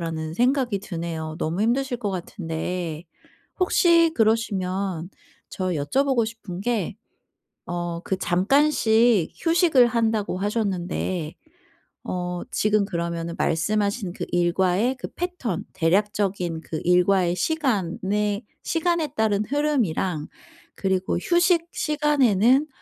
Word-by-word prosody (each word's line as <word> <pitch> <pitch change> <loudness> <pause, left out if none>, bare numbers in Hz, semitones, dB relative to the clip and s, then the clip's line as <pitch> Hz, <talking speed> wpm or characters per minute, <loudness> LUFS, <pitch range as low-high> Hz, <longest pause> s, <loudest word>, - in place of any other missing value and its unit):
라는 160 -1 -4
생각이 245 -3 +1
드네요. 165 -5 -5
너무 170 +6 -1
힘드실 250 +2 +1
것 210 -4 -2
같은데. 175 -2 -4 0.6
혹시 335 -2 +4
그러시면 195 - 0 0.4
저 185 - -3
여쭤보고 235 - +1
싶은 215 -5 -7
게 215 -3 -1 0.7
어 175 -1 -3
그 190 - -1
“잠깐씩 220 - +3
휴식을 330 -7 +4
한다.“고 220 -5 0
하셨는데 185 -5 -2 0.7
어 180 -1 -3
지금 210 -1 +2
그러면은 170 -2 -3
말씀하신 200 +3 0
그 - - -5
일과의 185 +7 +2
그 - - -5
패턴 350 - -3
대략적인 185 -1 0
그 160 - -5
일과의 180 0 +3
시간에 210 - -1 0.2
시간에 335 -1 0
따른 215 -2 +1
흐름이랑 225 - 0 0.5
그리고 190 -2 0
휴식 345 - +2
시간에는 280 -4 +3
200 Hz, 245 characters per minute, -24 LUFS, 175-245 Hz, 0.7 s, 혹시